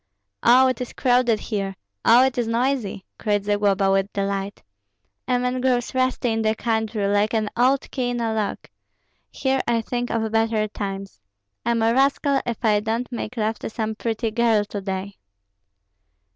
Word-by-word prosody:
"Oh, 255 Hz, +2 st, +6 dB
it 255 Hz, -1 st, -1 dB
is 250 Hz, -, -5 dB
crowded 245 Hz, -3 st, +2 dB
here! 195 Hz, -3 st, -3 dB, 0.3 s
Oh, 240 Hz, +3 st, +6 dB
it 265 Hz, -, -1 dB
is 240 Hz, -2 st, -1 dB
noisy!" 230 Hz, -4 st, -1 dB
cried 205 Hz, -2 st, 0 dB
Zagloba, 205 Hz, -1 st, +2 dB
with 195 Hz, +1 st, +1 dB
delight. 200 Hz, 0 st, -3 dB, 0.6 s
"A 250 Hz, -1 st, +2 dB
man 250 Hz, +1 st, -1 dB
grows 250 Hz, -1 st, +1 dB
rusty 255 Hz, -2 st, +1 dB
in 225 Hz, 0 st, 0 dB
the 220 Hz, 0 st, +1 dB
country, 220 Hz, -2 st, -1 dB
like 205 Hz, +2 st, +1 dB
an 215 Hz, -1 st, 0 dB
old 260 Hz, +3 st, +3 dB
key 250 Hz, -3 st, -1 dB
in 245 Hz, 0 st, -2 dB
a 225 Hz, -1 st, -1 dB
lock; 215 Hz, -2 st, -3 dB, 0.6 s
here 265 Hz, -1 st, 0 dB
I 235 Hz, -1 st, +2 dB
think 245 Hz, +2 st, -3 dB
of 225 Hz, -1 st, -1 dB
better 225 Hz, -1 st, +1 dB
times. 195 Hz, -, -6 dB, 0.4 s
I'm 235 Hz, -1 st, +1 dB
a 225 Hz, +1 st, +3 dB
rascal 275 Hz, +1 st, +2 dB
if 235 Hz, 0 st, -3 dB
I 210 Hz, -1 st, +4 dB
don't 225 Hz, +4 st, -2 dB
make 240 Hz, 0 st, -5 dB
love 220 Hz, 0 st, -1 dB
to -, -, -5 dB
some 220 Hz, -1 st, -3 dB
pretty 225 Hz, +1 st, -2 dB
girl 225 Hz, -2 st, +2 dB
to 205 Hz, -1 st, -5 dB
day." 195 Hz, 0 st, -5 dB
225 Hz, 170 wpm, -23 LUFS, 205-245 Hz, 0.6 s, Oh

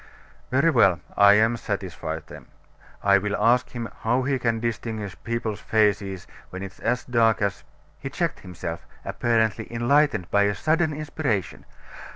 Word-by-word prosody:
"Very 140 Hz, +6 st, +3 dB
well. 95 Hz, -, +4 dB, 0.2 s
I 100 Hz, 0 st, +7 dB
am 110 Hz, +2 st, +3 dB
satisfied 95 Hz, -7 st, -4 dB
then. -, -, -12 dB, 0.6 s
I 100 Hz, 0 st, +5 dB
will 105 Hz, +1 st, -2 dB
ask 125 Hz, +2 st, +3 dB
him 120 Hz, -2 st, -5 dB
how 120 Hz, +3 st, +1 dB
he 135 Hz, 0 st, 0 dB
can 115 Hz, -2 st, 0 dB
distinguish 110 Hz, -3 st, -4 dB
people's 115 Hz, -2 st, -3 dB
faces 100 Hz, -3 st, 0 dB, 0.2 s
when 95 Hz, +1 st, -7 dB
it 95 Hz, -, -6 dB
is -, -, -23 dB
as 120 Hz, +1 st, -1 dB
dark 115 Hz, -3 st, +3 dB
as 100 Hz, -1 st, -2 dB, 0.2 s
" -, -, -34 dB
He 135 Hz, -, -4 dB
checked 165 Hz, +3 st, -2 dB
himself, 85 Hz, -2 st, -7 dB, 0.2 s
apparently 110 Hz, -2 st, 0 dB
enlightened 120 Hz, -, +2 dB
by 100 Hz, 0 st, +4 dB
a 105 Hz, -, -2 dB
sudden 160 Hz, -, +1 dB
inspiration. 145 Hz, -, -3 dB
115 Hz, 160 wpm, -24 LUFS, 100-125 Hz, 0.6 s, I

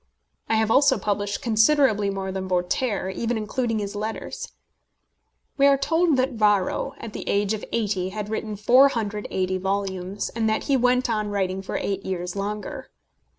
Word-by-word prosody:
I 225 Hz, -, +3 dB
have 220 Hz, 0 st, +2 dB
also 275 Hz, +1 st, +5 dB
published 205 Hz, -1 st, -2 dB
considerably 220 Hz, -2 st, +3 dB
more 195 Hz, -1 st, -3 dB
than 190 Hz, 0 st, -4 dB
Voltaire, 190 Hz, +3 st, -1 dB
even 230 Hz, +4 st, -2 dB
including 225 Hz, +2 st, -1 dB
his 205 Hz, -1 st, -4 dB
letters. 215 Hz, +2 st, -5 dB, 1.1 s
We 280 Hz, 0 st, +5 dB
are 280 Hz, 0 st, +5 dB
told 325 Hz, +1 st, +2 dB
that 260 Hz, +1 st, +1 dB
Varro, 210 Hz, -5 st, +1 dB
at 225 Hz, -, -8 dB
the -, -, -5 dB
age 200 Hz, +1 st, +1 dB
of 215 Hz, -, -4 dB
eighty, 200 Hz, -5 st, -1 dB
had 210 Hz, +1 st, -5 dB
written 215 Hz, 0 st, -3 dB
480 210 Hz, -5 st, +2 dB
volumes, 190 Hz, 0 st, -2 dB
and 225 Hz, -1 st, -1 dB
that 220 Hz, -, 0 dB
he 280 Hz, -, +1 dB
went 250 Hz, 0 st, +2 dB
on 215 Hz, -3 st, -1 dB
writing 190 Hz, -2 st, -1 dB
for 190 Hz, -, -6 dB
eight 195 Hz, 0 st, -2 dB
years 180 Hz, -1 st, -4 dB
longer. 210 Hz, +7 st, -5 dB
210 Hz, 160 wpm, -24 LUFS, 195-240 Hz, 1.1 s, also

